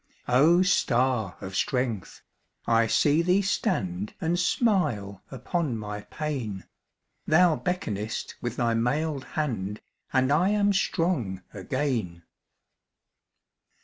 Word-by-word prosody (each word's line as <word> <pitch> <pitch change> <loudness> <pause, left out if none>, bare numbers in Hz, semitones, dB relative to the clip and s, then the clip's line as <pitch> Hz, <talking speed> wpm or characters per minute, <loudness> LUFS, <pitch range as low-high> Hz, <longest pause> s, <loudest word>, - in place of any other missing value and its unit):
O 155 +9 +5
star 125 - +1
of 95 0 -6
strength! 120 -4 -2 0.4
I 115 0 +3
see 145 +7 +3
thee 180 +3 +2
stand 105 - -1
And 170 +2 0
smile 150 - +1
upon 135 0 -2
my 105 -1 -5
pain; 125 - -4 0.6
Thou 165 +1 +5
beckonest 110 - -3
with 120 -1 -3
thy 120 -2 +1
mailed 135 +5 0
hand, 110 -9 -2 0.3
And 130 +1 +2
I 170 +6 +3
am 205 -1 +2
strong 160 - 0
again. 95 -4 -2
130 Hz, 105 wpm, -27 LUFS, 105-165 Hz, 0.6 s, O